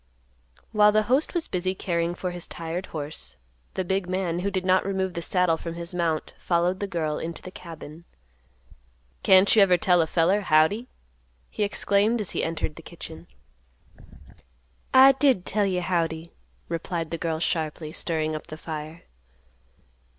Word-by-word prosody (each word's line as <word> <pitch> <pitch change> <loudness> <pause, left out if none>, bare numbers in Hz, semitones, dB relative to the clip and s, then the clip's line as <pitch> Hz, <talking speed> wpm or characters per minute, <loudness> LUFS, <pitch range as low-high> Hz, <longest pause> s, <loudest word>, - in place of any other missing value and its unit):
While 210 -1 +5
the 215 +1 +3
host 260 - +1
was 340 - -1
busy 185 +1 -1
caring 170 -2 -1
for 180 0 -3
his 175 -1 -4
tired 170 +3 -5
horse, 150 - -4 0.4
the 190 - 0
big 190 0 -1
man, 180 -2 -1
who 195 +3 -1
did 185 -2 -2
not 185 0 +4
remove 190 -1 -1
the 170 - -4
saddle 180 -1 +2
from 165 0 -6
his 170 +1 -6
mount, 165 -3 -1
followed 175 +2 +1
the 200 - -2
girl 160 -5 -2
into 165 +1 -6
the 185 - -8
cabin. 165 -2 -10 1.2
"Can't 190 +2 +6
you 215 - +7
even 185 -2 +5
tell 180 -3 +4
a 160 - 0
feller, 180 +6 +2
Howdy?" 190 +7 +3 0.6
he - - -5
exclaimed, 205 +2 +2
as 210 - -2
he - - -1
entered 165 -2 -3
the - - -8
kitchen. 85 - -10 1.6
"I 265 +1 +9
did 265 -8 +2
tell 205 0 +1
you, 180 -2 0
Howdy," 170 -2 -1 0.4
replied 165 -1 -3
the 165 - -3
girl 165 -2 -1
sharply, 160 -2 -2
stirring 155 -2 -2
up 155 - -7
the 155 -2 -8
fire. 155 +1 -7
175 Hz, 165 wpm, -25 LUFS, 165-195 Hz, 1.6 s, I